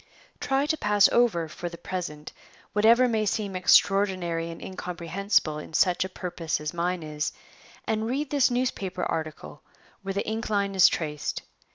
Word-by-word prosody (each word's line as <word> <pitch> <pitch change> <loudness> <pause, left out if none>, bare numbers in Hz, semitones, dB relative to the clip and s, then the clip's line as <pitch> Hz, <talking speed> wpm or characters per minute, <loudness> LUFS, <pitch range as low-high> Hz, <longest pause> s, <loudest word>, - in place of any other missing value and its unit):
Try 270 +1 +1
to 315 +1 0
pass 210 -3 +4
over, 215 -9 +2
for 175 +3 -6
the 170 - -10
present, 165 -6 -6 0.4
whatever 230 +4 +5
may 220 -3 0
seem 205 -1 -2
extraordinary 185 -3 +3
and 165 - -8
incomprehensible 180 -2 -1
in 155 - -9
such 180 -1 +3
a 190 - -5
purpose 175 -3 -3
as 150 +1 -4
mine 175 0 -1
is, 150 0 -3 0.5
and 220 0 -1
read 275 +4 -2
this 285 -3 +4
newspaper 245 -6 -2
article 155 -3 -4 0.4
where 195 -1 -4
the 200 - -1
ink 220 +1 -3
line 200 -2 0
is 190 -3 +7
traced. 150 -3 -3
190 Hz, 160 wpm, -26 LUFS, 165-215 Hz, 0.5 s, is